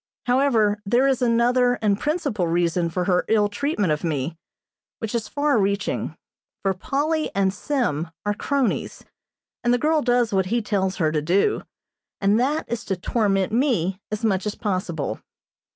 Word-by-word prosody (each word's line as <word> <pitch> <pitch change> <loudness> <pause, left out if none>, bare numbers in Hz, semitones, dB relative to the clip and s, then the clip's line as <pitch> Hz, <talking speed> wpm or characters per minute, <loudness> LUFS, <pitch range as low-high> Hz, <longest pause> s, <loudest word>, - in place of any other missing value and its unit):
However, 235 -5 +2
there 240 +6 +3
is 265 -2 +1
another 245 +1 +3
and 205 -3 0
principal 290 - -1
reason 170 0 +1
for 180 +2 -1
her 180 -1 +2
ill 210 -2 +3
treatment 205 - 0
of 150 - -4
me, 155 -1 -2 0.6
which 225 -1 -5
is 230 -3 -1
far 285 0 +1
reaching, 200 +1 -1 0.5
for 195 -1 +2
Polly 295 - -1
and 195 -1 +2
Sim 205 - -1 0.2
are 205 - +1
cronies, 270 +2 -1 0.6
and 240 - +2
the 245 - +4
girl 310 +4 +2
does 245 -3 +2
what 190 -1 +2
he 235 +5 +1
tells 195 -3 -1
her 155 -4 +1
to 155 -1 0
do, 185 - +2 0.6
and 200 +3 +3
that 285 +5 0
is 235 -1 -3
to 195 - -1
torment 195 0 0
me 205 - +1
as 215 +2 -3
much 195 -2 +1
as 210 - -3
possible. 185 -7 -2
210 Hz, 165 wpm, -23 LUFS, 190-245 Hz, 0.6 s, the